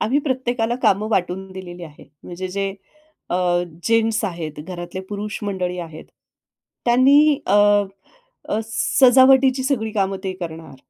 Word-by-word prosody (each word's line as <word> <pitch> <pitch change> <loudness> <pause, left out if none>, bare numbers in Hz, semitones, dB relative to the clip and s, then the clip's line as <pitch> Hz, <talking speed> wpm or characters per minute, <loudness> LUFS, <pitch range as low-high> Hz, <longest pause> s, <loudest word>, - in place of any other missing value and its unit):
आम्ही 260 +7 +1
प्रत्येकाला 245 -4 -1
कामं 210 +3 +2
वाटून 190 0 -1
दिलेली 180 -2 -9
आहे. 150 -2 -14 0.2
म्हणजे 185 +1 -6
जे 195 +1 -3 0.6
अ, - - 0 0.5
जेन्ट्स 225 -1 +1
आहेत, 170 -5 -4
घरातले 175 +2 -7
पुरुष 210 +1 -5
मंडळी 180 -3 -3
आहेत, 160 -2 -8 0.8
त्यांनी 280 +4 +5
अ, 195 - +2 0.9
अ, 215 - 0
सजावटीची 260 +2 +4
सगळी 245 -5 -1
कामं 195 -2 0
ते 190 - -2
करणार. 165 -3 -7
205 Hz, 125 wpm, -21 LUFS, 180-245 Hz, 0.9 s, त्यांनी